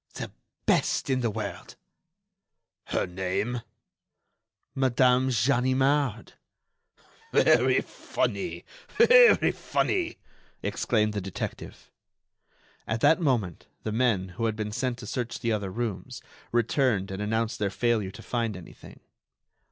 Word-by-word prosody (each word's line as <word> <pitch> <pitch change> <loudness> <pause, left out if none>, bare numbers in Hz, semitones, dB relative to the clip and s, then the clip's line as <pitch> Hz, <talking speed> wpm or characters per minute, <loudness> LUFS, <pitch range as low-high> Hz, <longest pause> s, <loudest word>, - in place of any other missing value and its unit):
"The - - -5 0.3
best - - +1
in 130 - +2
the 120 -2 0
world." 105 - -6 1.1
"Her - - -1
name?" 95 +7 -2 1.1
"Madame 130 0 +3
Ganimard." 130 +1 +1 1.0
"Very - - +4
funny! - - -3 0.3
very 485 -1 +7
funny!" 350 -3 -1 0.5
exclaimed 105 -2 0
the 105 - -2
detective. 95 0 -7 1.0
At 110 0 -2
that 165 +3 +4
moment 115 - -1 0.2
the 110 - -2
men, 110 -5 +1
who 115 +6 -3
had 110 -1 0
been 105 -1 -4
sent 125 +2 -2
to 120 - -9
search 120 +1 -4
the 115 - -1
other 100 -3 -1
rooms, 110 0 -5 0.3
returned 120 -4 +1
and 95 +1 -4
announced 110 +2 -1
their 105 -1 +1
failure 110 -1 0
to - - -11
find 115 -5 -2
anything. 90 - -13
115 Hz, 115 wpm, -27 LUFS, 105-130 Hz, 1.1 s, very